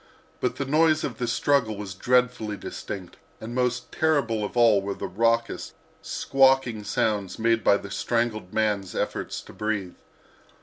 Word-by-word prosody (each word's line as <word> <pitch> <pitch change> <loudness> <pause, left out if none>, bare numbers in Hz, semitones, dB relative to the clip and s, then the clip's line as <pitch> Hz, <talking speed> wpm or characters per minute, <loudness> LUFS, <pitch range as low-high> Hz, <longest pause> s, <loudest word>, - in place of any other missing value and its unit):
But 125 -1 -1
the 140 - -3
noise 155 +2 +3
of - - -4
the 120 - -1
struggle 115 -3 +1
was 100 -2 -6
dreadfully 125 -1 +1
distinct, 95 -1 -7 0.2
and 115 +2 -7
most 125 0 -1
terrible 140 -9 +1
of 105 - -5
all 115 -4 +5
were 100 0 -4
the - - -5
raucous, 115 +3 0 0.3
squawking 135 -5 +2
sounds 100 -2 -1
made 115 0 +2
by 100 - +5
the 100 - -9
strangled 115 -5 -1
man's 105 -4 0
efforts - - -3
to - - -14
breathe. 105 -4 -2
115 Hz, 155 wpm, -25 LUFS, 105-125 Hz, 0.3 s, all